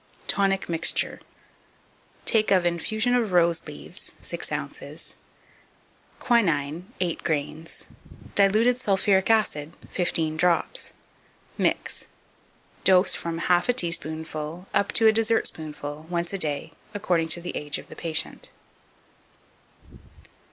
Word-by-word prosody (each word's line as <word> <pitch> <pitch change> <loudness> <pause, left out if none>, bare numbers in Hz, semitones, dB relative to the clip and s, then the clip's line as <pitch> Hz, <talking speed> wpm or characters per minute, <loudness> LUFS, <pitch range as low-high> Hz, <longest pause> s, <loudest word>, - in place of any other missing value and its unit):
2559. - - +4
Tonic 195 -1 +1
Mixture. 165 -1 0 1.0
Take 220 -2 +3
of 185 -3 +4
infusion 215 +8 +1
of 230 -6 +1
rose 170 -1 +3
leaves, - - -6
6 - - -1
ounces; - - -4 1.0
quinine, 170 - +1
8 175 -3 -1
grains; 155 +1 -3 0.5
diluted 215 +5 +4
sulphuric 195 -3 +2
acid, 170 -9 +2 0.2
15 160 -3 0
drops. 175 0 +1 0.6
Mix. - - 0 0.8
Dose, 185 0 +5
from 170 -1 -3
half 180 +6 +3
a - - +5
teaspoonful 160 - -2
up 200 - +2
to 225 - +3
a 220 - +7
dessertspoonful, 155 -9 -1
once 175 +1 -2
a 195 - -2
day, 150 -1 0 0.2
according 175 -5 +1
to 170 - +2
the 175 +1 -5
ago 145 0 -2
of - - -12
the - - -11
patient. 160 -2 -1
175 Hz, 115 wpm, -26 LUFS, 160-200 Hz, 1.0 s, a